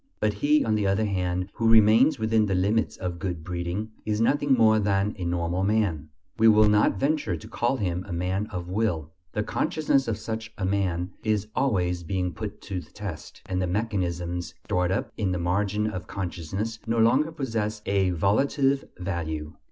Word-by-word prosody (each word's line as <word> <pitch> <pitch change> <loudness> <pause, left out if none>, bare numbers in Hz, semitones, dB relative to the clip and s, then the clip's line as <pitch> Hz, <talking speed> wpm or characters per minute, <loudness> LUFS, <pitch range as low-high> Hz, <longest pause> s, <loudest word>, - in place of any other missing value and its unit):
But 105 -1 +1
he, 145 +8 +2
on 110 - +1
the 105 -2 +1
other 100 +3 +2
hand, 90 -1 -1
who 115 -1 +1
remains 115 +6 +6
within 110 -1 +2
the 95 - 0
limits 105 +5 +1
of 90 -2 -4
good 90 -4 -4
breeding, 90 +5 -3
is 105 0 -1
nothing 140 +4 +3
more 110 -3 +5
than 100 0 +1
a 90 - -3
normal 85 +1 -1
man. 95 -8 0 0.3
We 115 - +6
will 110 -1 +6
not 105 -2 +3
venture 145 - 0
to - - -11
call 120 +3 0
him 90 -4 -2
"a - - -7
man 90 +4 -1
of 90 -5 -6
will"; 90 -6 -1 0.2
the 105 - 0
consciousness 145 0 +1
of 110 -3 -1
such 110 0 -5
a 95 - -2
man 95 -2 0
is 105 -2 0
always 90 -9 +1
being 90 0 -2
put 105 +4 -6
to 95 -3 -4
the - - -16
test, 95 -7 -8
and 95 0 -2
the 90 - 0
mechanisms 90 -4 -2
stored 90 0 +1
up 95 - -1
in 95 -4 0
the - - -1
margin 100 +4 0
of 95 -4 -4
consciousness 95 +4 -4
no 115 +1 0
longer 130 +8 +4
possess 110 -8 -3
a 95 -1 +2
"volitive 135 - +2
value." 80 -4 -4
100 Hz, 185 wpm, -26 LUFS, 90-110 Hz, 0.3 s, remains